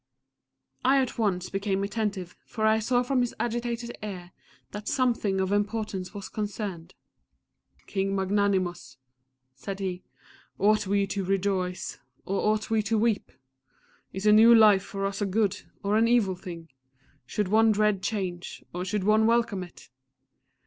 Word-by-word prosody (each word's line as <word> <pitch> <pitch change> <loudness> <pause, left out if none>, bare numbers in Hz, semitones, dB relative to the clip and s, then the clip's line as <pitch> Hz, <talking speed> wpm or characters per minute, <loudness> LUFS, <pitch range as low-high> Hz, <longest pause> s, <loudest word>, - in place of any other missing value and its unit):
I 265 +2 +4
at 255 -3 -2
once 185 -4 0
became 195 0 -1
attentive, 200 -4 -3
for 220 - -2
I 220 0 +4
saw 245 +3 +1
from 255 0 +1
his 245 - -2
agitated 240 0 -3
air 185 -4 -7 0.4
that 210 0 -7
something 235 -7 +1
of 190 0 0
importance 205 -2 -1
was 200 -2 -7
concerned. 200 -5 -5 0.9
"King 195 0 -1
Magnanimous," 190 -4 0 0.6
said 195 +9 -7
he, 185 -2 -3 0.6
"ought 210 0 +3
we 200 0 +2
to 195 0 -3
rejoice 190 -1 -1 0.3
or 195 - -1
ought 215 +1 -2
we 220 -1 +3
to 220 +1 0
weep? 220 -1 0 0.8
Is 190 +2 -5
a 210 - +6
new 225 +2 +8
life 210 -3 +7
for 195 0 -4
us 195 +1 -3
a 205 - +1
good, 205 0 0 0.2
or 200 +1 +1
an 225 +1 +4
evil 230 -5 +3
thing? 170 -2 -9 0.6
Should 205 +4 -1
one 220 +2 +5
dread 210 -2 +2
change, 185 -4 -4
or 180 +1 -3
should 190 +1 -2
one 215 +2 +4
welcome 230 -4 +1
it? 175 -7 -12
205 Hz, 150 wpm, -27 LUFS, 190-220 Hz, 0.9 s, new